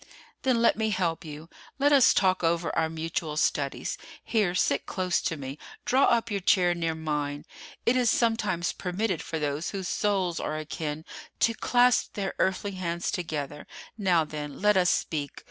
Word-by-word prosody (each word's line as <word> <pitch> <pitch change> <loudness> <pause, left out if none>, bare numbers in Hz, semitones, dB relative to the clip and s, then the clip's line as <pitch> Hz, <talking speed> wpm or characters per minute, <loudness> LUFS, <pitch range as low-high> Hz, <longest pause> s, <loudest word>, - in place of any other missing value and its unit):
"Then, 245 -3 +2
let 230 - +4
me 220 0 +1
help 175 -5 -1
you. 155 0 -9 0.3
Let 285 +1 +3
us 275 -4 +7
talk 185 -2 +2
over 165 +1 +1
our 160 -1 +1
mutual 160 -1 -3
studies. 140 -3 -1 0.2
Here, 205 -6 +1
sit 140 -5 +1
close 185 -2 0
to 160 - -2
me, 135 +1 -7 0.3
draw 265 +2 +4
up 230 -1 +2
your 200 - 0
chair 180 -1 +3
near 165 -2 -2
mine. 150 -2 -3 0.4
It 235 - +3
is 250 -2 +3
sometimes 210 -7 +1
permitted 185 0 -2
for 165 - -4
those 150 +1 -2
whose 190 -3 -4
souls 190 -5 0
are 155 - -3
akin 155 0 -5 0.4
to 230 - +4
clasp 245 +2 +3
their 195 -2 -2
earthly 190 +2 0
hands 175 -2 -3
together. 150 -4 -4 0.3
Now 185 -6 +2
then, 150 -2 -6
let 210 +1 +4
us 180 -1 +4
speak. 145 -3 -2
175 Hz, 170 wpm, -27 LUFS, 155-205 Hz, 0.4 s, us